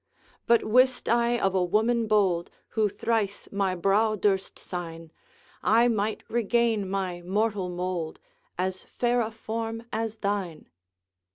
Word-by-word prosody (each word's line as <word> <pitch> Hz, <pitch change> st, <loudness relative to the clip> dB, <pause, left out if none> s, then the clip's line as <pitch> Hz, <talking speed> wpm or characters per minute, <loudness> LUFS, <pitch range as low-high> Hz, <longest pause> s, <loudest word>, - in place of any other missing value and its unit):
'But 235 Hz, 0 st, +5 dB
wist 255 Hz, +3 st, +3 dB
I 235 Hz, 0 st, +3 dB
of 195 Hz, -1 st, +1 dB
a 185 Hz, -1 st, +2 dB
woman 220 Hz, +5 st, +2 dB
bold, 190 Hz, -5 st, +2 dB, 0.2 s
Who 215 Hz, -2 st, +1 dB
thrice 215 Hz, -1 st, -1 dB
my 195 Hz, -2 st, 0 dB
brow 205 Hz, +4 st, +2 dB
durst 195 Hz, -2 st, 0 dB
sign, 165 Hz, -2 st, -7 dB, 0.5 s
I 235 Hz, +2 st, +4 dB
might 215 Hz, -1 st, -1 dB
regain 230 Hz, -3 st, +1 dB
my 185 Hz, -3 st, -2 dB
mortal 200 Hz, +1 st, 0 dB
mould, 175 Hz, -2 st, -3 dB, 0.4 s
As 185 Hz, 0 st, -2 dB
fair 240 Hz, 0 st, 0 dB
a 220 Hz, -, -1 dB
form 225 Hz, 0 st, -4 dB
as 225 Hz, 0 st, -2 dB
thine.' 200 Hz, -6 st, -3 dB
210 Hz, 130 wpm, -27 LUFS, 185-225 Hz, 0.5 s, But